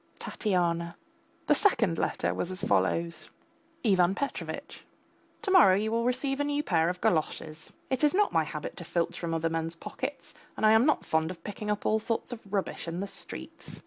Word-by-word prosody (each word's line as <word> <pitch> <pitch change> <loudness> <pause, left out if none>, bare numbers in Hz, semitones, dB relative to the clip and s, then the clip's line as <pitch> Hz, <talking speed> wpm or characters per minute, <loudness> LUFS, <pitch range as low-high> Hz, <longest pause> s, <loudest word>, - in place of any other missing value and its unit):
TATYANA. 170 -4 -1 0.5
The - - +5
second 225 - +2
letter - - 0
was 180 - -2
as 185 +1 -6
follows: 135 - 0 0.5
IVAN 190 -4 +4
PETROVITCH, 280 +4 -5 0.6
To 395 - -1
morrow 320 - +7
you 215 +3 0
will 230 +1 +1
receive 270 +2 0
a - - +2
new 290 0 0
pair 165 - +2
of 180 0 -4
galoshes. 155 -1 -1 0.2
It 260 +2 0
is 295 - +5
not 415 +1 +3
my - - +3
habit - - -6
to - - -7
filch 170 -1 -1
from 170 -1 -3
other 165 0 0
men's 165 0 -2
pockets, - - -6 0.2
and - - +1
I 215 - +7
am 220 +5 +5
not 300 - +2
fond 160 0 +1
of 170 -2 -8
picking 210 +1 -5
up 210 0 -1
all 220 - +3
sorts 230 +2 -2
of 235 - -7
rubbish 195 -3 -2
in 165 +1 -3
the 200 - -2
streets. 200 - -9
190 Hz, 195 wpm, -29 LUFS, 170-235 Hz, 0.6 s, morrow